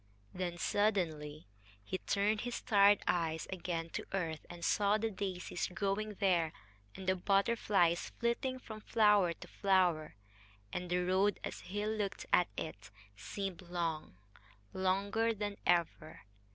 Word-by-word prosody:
Then 180 -1 -3
suddenly 165 -7 0 0.4
he 185 - -3
turned 205 +1 +1
his 245 0 -3
tired 205 -2 +5
eyes 160 -2 0
again 170 -2 -3
to - - -4
earth, 165 -5 -2
and 175 -1 -6
saw 205 0 +3
the 225 +1 -1
daisies 185 -3 -3
growing 200 +2 -2
there, 175 -6 +2 0.4
and 190 - -8
the 185 - +4
butterflies 195 -3 +2
flitting 235 +2 0
from 220 -4 -9
flower 210 -5 +4
to - - -12
flower. 180 - +2 0.6
And 180 -1 -3
the 180 0 +1
road, 190 +2 +2
as - - -5
he 205 +2 -4
looked 210 -2 -2
at 180 - +5
it, 105 -10 -6 0.3
seemed 190 - -5
long 170 - -3 0.6
longer 200 +4 +1
than 205 -1 -3
ever. 170 -3 +1
190 Hz, 135 wpm, -34 LUFS, 170-205 Hz, 0.6 s, tired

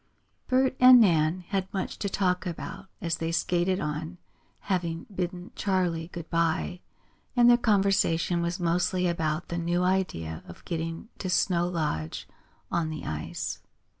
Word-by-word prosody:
Bert 260 0 +2
and 255 0 +9
Nan 170 -4 +3
had 190 -1 -1
much 195 -3 -3
to 200 - -1
talk 185 -1 0
about 190 +3 -6
as 165 -2 -1
they 165 0 -2
skated 180 +2 +1
on, 155 +4 -4 0.4
having 170 -3 -2
bidden 180 0 -4
Charley 180 -5 0
good 170 -2 -8
bye, 165 +2 0 0.6
and 240 -1 +6
their 240 - +8
conversation 195 -6 +2
was 170 +2 -2
mostly 180 +1 +1
about 165 -1 -1
the 170 - -2
new 175 +1 0
idea 130 - -1
of 85 - -12
getting 165 +4 -4
to 185 - -3
Snow 175 -1 +2
Lodge 150 - -3 0.4
on 165 -2 0
the 155 -1 -6
ice. 75 -1 -4
175 Hz, 145 wpm, -27 LUFS, 165-190 Hz, 0.6 s, and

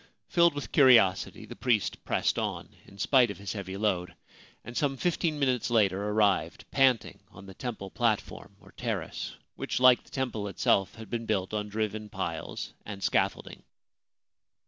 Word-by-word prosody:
Filled 170 -3 +4
with 145 - -5
curiosity, 120 -10 +4
the - - -10
priest 115 -5 0
pressed - - +1
on - - -3 0.2
in 100 - -15
spite 125 +3 +4
of 100 - -6
his 100 -2 -5
heavy 95 -2 -6
load, 95 -4 -1 0.5
and 120 - -9
some 135 -1 0
fifteen 165 0 0
minutes 130 -4 +1
later 100 -4 +2
arrived 105 -4 +1
panting 130 -4 +2
on - - -13
the 95 - -10
temple 105 -3 -6
platform, 110 -3 -2
or 100 -1 -18
terrace, - - -4 0.2
which, - - -3
like 130 -1 +6
the - - -21
temple 125 -6 -3
itself, 95 0 +1
had 110 -1 -11
been 115 -1 -3
built 100 -2 -1
on 105 -1 -2
driven 105 0 -3
piles - - -5
and 100 -2 -8
scaffolding. - - 0
110 Hz, 160 wpm, -29 LUFS, 100-125 Hz, 0.5 s, like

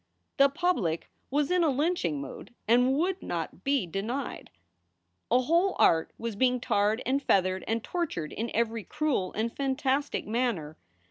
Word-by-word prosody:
The 275 -1 +6
public 275 - -1 0.2
was 290 +3 +1
in 360 -1 +3
a 320 - +4
lynching 280 - 0
mood 140 - -9
and 250 +4 +4
would 365 +4 0
not 170 +1 -4
be 275 -6 +1
denied. 215 +10 -4 0.8
A 245 +2 +4
whole 340 +8 +2
art 160 -1 +4
was 230 -2 -4
being 250 +3 +2
tarred 210 -1 +1
and 275 +2 +1
feathered 185 -6 +2
and 225 0 -1
tortured 300 - -3
in 230 +2 -3
every 230 -1 0
cruel 290 -11 -1
and 230 +2 -2
fantastic 275 +1 0
manner. 215 -10 -1
245 Hz, 150 wpm, -28 LUFS, 200-285 Hz, 0.8 s, The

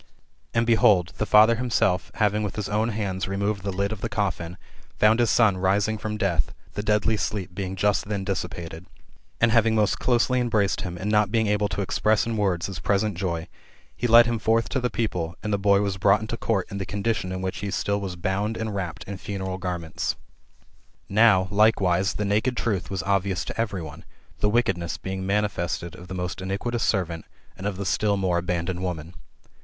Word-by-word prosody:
And 115 0 +3
behold, 105 -6 +4
the 105 - 0
father 110 +2 +7
himself, 115 -7 +1
having 105 0 +1
with 105 -2 -3
his 105 -2 -3
own 110 +2 0
hands 100 -4 -2
removed 100 +1 -1
the 100 +1 -3
lid 100 +2 -1
of 110 -2 -5
the 115 - -2
coffin, 95 -6 -2 0.4
found 110 +2 +4
his 120 -2 +3
son 105 -4 +4
rising 100 +3 +1
from 105 0 -3
death, 85 - 0 0.2
the 105 - -3
deadly 105 +1 +1
sleep 100 -4 -3
being 95 0 -4
just 100 +2 +1
then 100 -2 -2
dissipated; 85 -3 -5 0.5
and 115 -1 +4
having 115 -1 +4
most 105 -2 +2
closely 125 +1 +2
embraced 110 -5 +1
him, 90 -1 -5
and 100 +4 -2
not 105 -1 +3
being 110 -1 +2
able 105 0 +1
to 95 +1 -3
express 105 +3 +1
in 115 -1 -2
words 95 -5 0
his 95 -2 -5
present 100 0 0
joy, 85 -2 -3 0.5
he 120 - -1
led 120 0 +8
him 115 -1 -1
forth 115 +2 +1
to 130 - 0
the 125 -1 0
people, 90 -6 -2
and 105 -1 -1
the 100 - +1
boy 100 0 +4
was 100 -2 -1
brought 100 +2 +4
into 110 +1 -4
court, 110 -5 0
in 100 - -4
the - - -2
condition 100 -2 -1
in 95 0 -4
which 95 - -3
he 100 - -3
still 100 +1 -1
was 95 -3 -4
bound 95 +5 -1
and 110 -1 -3
wrapt 85 -4 -4
in 100 +2 -7
funeral 95 -1 -4
garments. 90 -3 -3 0.9
Now, 100 -3 +5
likewise, 100 -3 +3
the 105 - -1
naked 110 +5 +1
truth 95 -7 -1
was 95 -4 -3
obvious 95 -1 0
to - - -3
every 100 -6 -3
one, 80 +2 -9 0.4
the 105 - +2
wickedness 95 -7 0
being 95 0 -5
manifested 95 -4 -1
of 90 0 -11
the 95 - -6
most 90 +1 -4
iniquitous 100 +5 -2
servant, 85 -5 0 0.3
and 95 - -4
of 100 -3 -3
the 100 - -4
still 100 +3 +1
more 90 -3 +1
abandoned 90 0 -2
woman. 85 -2 -4
100 Hz, 200 wpm, -25 LUFS, 95-110 Hz, 0.9 s, led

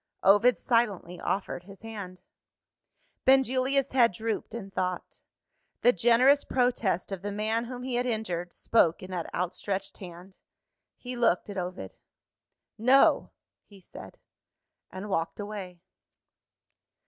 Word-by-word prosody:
Ovid 205 +6 +5
silently 205 -8 0
offered 185 -2 -3
his 195 0 -14
hand. 200 -5 -8 1.0
Benjulia's 265 +1 +3
head 240 -5 +4
drooped 220 +2 -4
in 195 -4 -7
thought. 185 -1 -4 0.6
The 245 - +5
generous 245 +8 +4
protest 235 -8 0
of 195 -2 -4
the 205 +1 -4
man 220 +3 -1
whom 250 +1 -7
he 255 -1 -4
had 245 +1 0
injured, 180 -7 -3
spoke 180 -6 +2
in 185 - -9
that 175 -2 -4
outstretched 190 +2 -3
hand. 180 +1 -11 0.6
He 250 0 -6
looked 230 -4 +1
at 200 - -7
Ovid. 175 - -6 0.9
"No!" 260 +4 +4 0.3
he 200 -2 -17
said 185 - -12 0.7
and 190 +3 -7
walked 165 -3 -2
away. 200 -4 -7
205 Hz, 125 wpm, -28 LUFS, 185-240 Hz, 1.0 s, Ovid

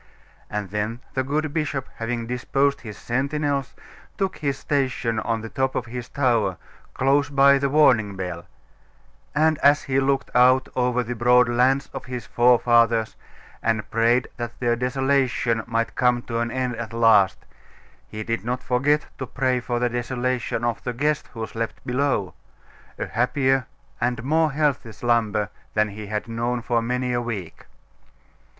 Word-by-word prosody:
And 105 -3 -4
then 105 +3 -2
the 130 - 0
good 150 +2 -2
bishop, 150 -4 -2
having 115 0 -3
disposed 135 +4 0
his 105 -3 -9
sentinels, 140 +2 -1 0.4
took 195 -1 -1
his 140 -3 -2
station 130 -6 -1
on 115 0 -1
the 115 - -7
top 130 +2 -1
of 125 - -1
his 120 +1 -7
tower, 115 -9 +1 0.4
close 140 +2 +2
by 140 0 +5
the 140 0 0
warning 120 -9 +4
bell; 90 -2 -5 0.9
and 155 0 +3
as 145 +1 +4
he 135 -1 +1
looked 135 0 0
out 130 +1 +5
over 125 -1 +1
the 120 +1 -4
broad 125 +1 +4
lands 130 +3 +2
of - - -6
his 125 -2 -6
forefathers, 120 -2 +3 0.5
and 110 -1 -1
prayed 115 +2 +2
that 120 -1 -6
their 120 -1 +1
desolation 125 -2 +1
might 115 0 -1
come 125 -1 +2
to 115 -1 -3
an 120 0 -1
end 125 -1 -2
at 115 -1 -6
last, 110 -5 +4 0.6
he 110 0 -6
did 115 +1 -2
not 125 +2 -3
forget 145 +4 +1
to 130 - -4
pray 130 0 0
for 120 0 -2
the 125 +1 +1
desolation 120 0 -2
of 120 -1 -1
the 125 - -3
guest 150 +4 0
who 115 -2 -4
slept 115 0 -5
below, 125 -6 0 0.6
a - - -3
happier 130 +1 +1 0.3
and 120 -1 0
more 155 +3 +2
healthy 140 -6 0
slumber 110 -3 0 0.3
than 105 0 +2
he 105 +1 -8
had 105 +2 -3
known 120 +2 -2
for 120 -1 +1
many 125 +1 -1
a 120 - 0
week. 105 -8 -6
125 Hz, 160 wpm, -23 LUFS, 115-135 Hz, 0.9 s, by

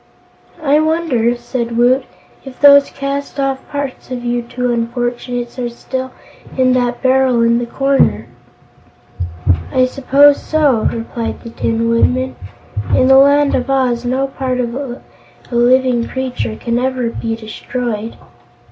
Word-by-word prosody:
"I 295 0 +4
wonder," 310 -7 +1
said 235 -2 -4
Woot, 250 +2 +3 0.4
"if 265 -2 -11
those 285 -1 +7
cast 280 +1 -4
off 270 -1 0
parts 285 -3 -5
of 245 -1 -5
you 240 0 0
two 245 +1 -2
unfortunates 240 +1 -3
are 240 -1 -2
still 260 +2 -5 0.5
in 255 -1 +3
that 245 0 -1
barrel 260 -2 +3
in 235 0 +3
the 240 - -4
corner?" 270 - +1 1.5
"I 255 0 +3
suppose 280 +2 +4
so." 290 -8 +2
replied 230 0 -5
the 230 - -9
Tin 230 0 -1
Woodman. 255 +3 +1 0.6
"In 255 - +3
the 265 0 +8
Land 285 +1 +4
of 250 +1 -1
Oz 255 -3 +1
no 260 +2 0
part 265 -2 -3
of 235 -1 -2
a 260 -1 -6 0.5
living 245 0 +2
creature 250 - -3
can 235 - -2
ever 255 -2 -1
be 225 -1 -3
destroyed." 225 0 -5
255 Hz, 140 wpm, -16 LUFS, 235-270 Hz, 1.5 s, the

